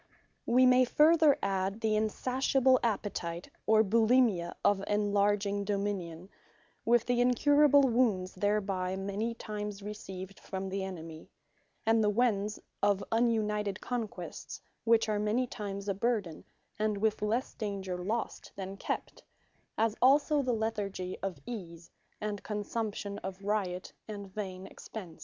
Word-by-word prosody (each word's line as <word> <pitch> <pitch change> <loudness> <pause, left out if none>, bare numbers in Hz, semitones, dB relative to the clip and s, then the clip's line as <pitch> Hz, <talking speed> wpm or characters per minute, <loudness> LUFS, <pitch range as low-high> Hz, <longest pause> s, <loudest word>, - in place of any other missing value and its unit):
We 255 +2 +5
may 255 0 +6
further 305 +3 +5
adde, 195 +2 -1
the 220 -1 +2
insatiable 255 +4 +2
appetite, 195 -6 -2 0.2
or 220 0 +6
Bulimia, 225 -4 +3
of 200 -1 +3
enlarging 205 -1 +1
Dominion; 195 -4 -3 0.5
with 235 0 +3
the 245 -1 +2
incurable 285 +3 +5
Wounds 225 -8 +2
thereby 195 -2 0
many 200 +4 -2
times 210 -2 -5
received 195 -2 -7
from 190 0 -5
the 195 0 -2
enemy; 165 -4 -8 0.6
And 225 0 +4
the 210 - +3
Wens, 210 -2 +1 0.2
of 200 -1 +2
ununited 210 -3 +1
conquests, 235 -4 -5 0.3
which 225 -1 +4
are 210 -1 0
many 215 +5 +1
times 200 -4 -6
a 200 - +1
burthen, 200 -5 -1 0.3
and 215 -1 +1
with 215 +1 0
lesse 225 +5 -1
danger 195 -3 -4
lost, 205 +6 -3
than 195 0 -6
kept; - - -4 0.6
As 225 0 +2
also 285 +3 +5
the 255 -2 0
Lethargy 205 -5 -2
of 195 -4 -3
Ease, 170 -7 -8 0.3
and 210 -1 -3
Consumption 210 -1 -3
of 190 +1 -7
Riot 195 -3 -2
and 200 -3 -7
Vain 190 -3 -5
Expence. 190 -3 -9
210 Hz, 130 wpm, -31 LUFS, 195-230 Hz, 0.6 s, may